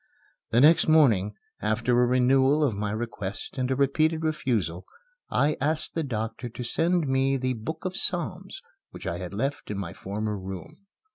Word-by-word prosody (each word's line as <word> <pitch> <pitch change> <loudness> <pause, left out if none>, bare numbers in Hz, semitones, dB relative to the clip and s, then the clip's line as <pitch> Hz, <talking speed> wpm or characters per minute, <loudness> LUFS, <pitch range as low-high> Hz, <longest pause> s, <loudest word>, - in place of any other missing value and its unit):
The 120 - +3
next 155 +4 +6
morning, 115 -11 +4 0.3
after 110 +3 0
a 125 - +4
renewal 130 +4 +3
of 135 -6 +2
my 105 +1 -2
request 110 +1 -5
and 130 0 0
a 130 - +1
repeated 155 +4 +1
refusal, 115 - -1 0.5
I 150 +2 +2
asked 155 +2 -1
the 165 - -1
doctor 115 -3 -4
to 125 +2 -7
send 165 +6 +1
me 135 +1 +2
the 130 0 -1
"Book 155 +10 -6
of 185 0 -2
Psalms" - - -1 0.3
which - - -11
I - - -3
had - - -6
left 140 +1 -2
in 105 - -3
my 95 -4 -5
former 105 +2 -4
room. 95 - -8
130 Hz, 170 wpm, -26 LUFS, 110-150 Hz, 0.5 s, next